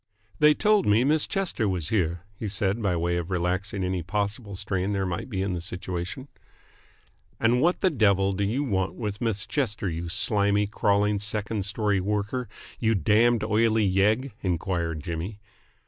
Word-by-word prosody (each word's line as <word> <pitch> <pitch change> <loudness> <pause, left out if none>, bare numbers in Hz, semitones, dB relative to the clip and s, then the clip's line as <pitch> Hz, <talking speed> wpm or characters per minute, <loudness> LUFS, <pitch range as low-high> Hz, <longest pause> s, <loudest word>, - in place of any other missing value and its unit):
"They 150 0 +6
told 210 -1 +3
me 105 +3 +4
Miss 150 +3 +3
Chester 175 - -1
was 90 -4 -2
here," 85 -5 0 0.2
he 110 - -3
said 100 +2 0
by 100 -4 +1
way 85 +1 0
of 85 0 -4
relaxing 95 +2 -1
any 90 -1 -1
possible 100 +3 -3
strain 95 0 -2
there 100 -1 0
might 90 +6 -4
be 95 -5 -2
in 100 - -2
the 85 - -3
situation. 90 +8 -5 1.1
"And 120 +2 +3
what 175 +3 +2
the 185 - +3
devil 100 -7 +3
do 100 +1 -2
you 115 +8 0
want 95 -8 -1
with 105 -4 -5
Miss 110 -4 -1
Chester, 110 -8 -1
you 85 0 -4
slimy, 100 +2 +3
crawling 105 0 +1
second 105 0 0
story 105 -1 0
worker, 105 +5 -2 0.3
you 115 -1 +2
damned, 110 +5 +3
oily 110 0 +2
yegg?" 105 +8 +2
enquired 85 -3 -2
Jimmy. 85 +5 -4
100 Hz, 165 wpm, -26 LUFS, 95-110 Hz, 1.1 s, They